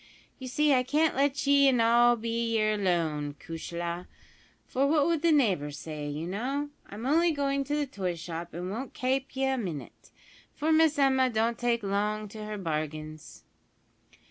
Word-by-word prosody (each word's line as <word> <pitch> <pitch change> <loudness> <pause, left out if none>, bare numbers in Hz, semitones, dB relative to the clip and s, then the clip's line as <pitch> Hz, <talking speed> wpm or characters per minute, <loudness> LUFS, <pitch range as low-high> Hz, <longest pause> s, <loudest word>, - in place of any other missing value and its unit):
"You 260 - -7
see 295 +3 +2
I 255 - +4
can't 300 +5 +1
let 280 +1 +1
ye 280 0 +5
in 255 -3 +3
all 240 +1 +5
be 230 0 -1
yer 215 0 +2
lone, 160 -7 -1
cushla; 170 +1 -5 0.6
for 270 +2 +1
what 295 -1 +3
would 330 -2 +1
the 335 0 +3
neighbours 185 - +2
say, 150 -1 -6
you 150 +3 -4
know! 265 +10 -3 0.2
I'm 215 +4 -7
only 330 +5 +3
goin' 275 -2 0
to 290 +2 -1
the 295 -1 0
toy 190 -9 -3
shop, 170 0 -6
an' 180 +2 -4
won't 245 +6 -6
kape 265 +1 -1
ye 270 0 +1
a 265 -1 0
minit, 170 - -7 0.5
for 310 +2 0
Miss 315 -1 +4
Emma 265 -2 +3
don't 230 0 0
take 235 -2 0
long 210 +2 -1
to 215 +1 -8
her 210 0 -5
bargains." 155 -3 -5
230 Hz, 175 wpm, -28 LUFS, 175-275 Hz, 0.6 s, ye